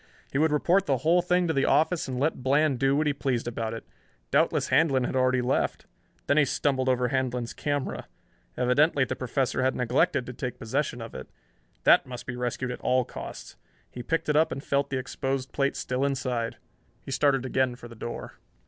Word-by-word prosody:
He 135 - 0
would 160 0 +3
report 175 +6 +2
the 135 - +2
whole 175 +2 +5
thing 180 0 +2
to 160 - +1
the 135 - +2
office 160 +2 +2
and 130 -1 -3
let 145 0 0
Bland 140 +1 +2
do 135 +1 +3
what 155 +2 +1
he 150 - +2
pleased 130 -4 -2
about 115 -1 -3
it. 115 - -8 0.5
Doubtless - - +2
Handlon 135 -6 +3
had 125 - -2
already 130 -1 +2
left. 130 +2 0 0.4
Then 145 - +2
he 150 - +6
stumbled 130 -1 0
over 125 -1 +1
Handlon's 125 -2 -1
camera. 145 -2 -3 0.5
Evidently 140 +4 +3
the - - -3
Professor 130 0 -1
had 130 +1 +1
neglected 125 0 +1
to 125 - -7
take 125 +1 -5
possession 125 +1 -2
of 115 - -9
it. 65 - -8 0.5
That - - +5
must 125 -1 -7
be 125 - -5
rescued, 125 +1 -2
at 125 - -7
all 130 -1 +2
costs. - - -9 0.3
He 125 - -7
picked 165 +7 -1
it 150 - +1
up 155 +2 +4
and 135 - -5
felt 140 0 0
the 130 - -1
exposed 135 0 -3
plate 140 0 0
still 125 +1 -2
inside. 125 -4 -1 0.5
He - - -8
started 135 -2 +2
again 130 -1 +1
for 120 -1 -11
the 120 - -12
door. 115 +1 -7
130 Hz, 200 wpm, -27 LUFS, 125-145 Hz, 0.5 s, he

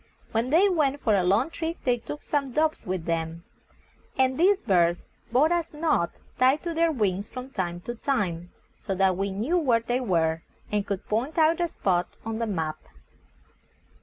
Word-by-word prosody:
When 230 +3 0
they 340 +8 +5
went 295 -7 +1
for 220 - +1
a 190 - +2
long 205 - +2
trip 330 0 -3
they 245 -2 +2
took 295 +5 -8
some 275 -4 -1
doves 310 -4 0
with 180 -3 -2
them, 165 0 -2 0.7
and 260 0 +3
these 375 +6 +4
birds 175 - +2 0.3
brought 285 +7 +4
us 340 -2 -1
notes 300 - -1
tied 260 +4 +4
to 340 -1 -2
their 330 0 +2
wings 205 -7 -1
from 255 +1 -8
time 175 -5 -3
to 240 - -5
time, 190 -10 -2 0.3
so 195 - -3
that 190 -1 +3
we 195 +2 -1
knew 230 - 0
where 245 -8 +2
they 240 +2 -1
were, 165 -8 +1 0.3
and 205 -1 0
could 200 -2 -4
point 240 +10 -1
out 320 +1 +4
the 345 - +2
spot 180 - 0 0.2
on 225 0 -3
the 230 - -1
map. 160 -6 -2
230 Hz, 185 wpm, -26 LUFS, 185-300 Hz, 0.7 s, they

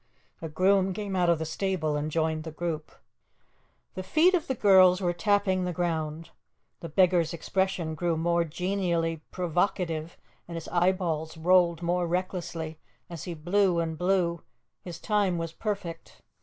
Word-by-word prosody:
A 165 - -5
groom 190 +4 +2
came 205 -2 -4
out 180 -2 +2
of 170 - +4
the 160 - -4
stable 160 -2 -1
and 150 +1 -2
joined 160 0 -1
the 160 - -6
group. 160 -1 -4 1.0
The 185 - -5
feet 315 - +3
of 345 -4 0
the 265 - -1
girls 185 -4 +6
were 175 -2 0
tapping 190 +1 +1
the 180 - -1
ground. 160 -2 -3 0.5
The 165 - -7
beggar's 170 -1 +3
expression 180 -1 -1
grew 165 +1 -1
more 170 +1 +1
genially 170 -1 -1
provocative, 175 -2 -1 0.3
and 170 - -7
his 165 - -6
eyeballs 175 -3 0
rolled 175 0 +3
more 175 0 0
recklessly 170 -3 -3 0.3
as 165 -3 -7
he 175 - -5
blew 175 +2 +2
and 165 -1 -2
blew; 175 -1 0 0.4
his 175 -3 -8
time 205 -4 +1
was 165 -1 -4
perfect. 195 -6 -5
175 Hz, 155 wpm, -27 LUFS, 165-185 Hz, 1.0 s, girls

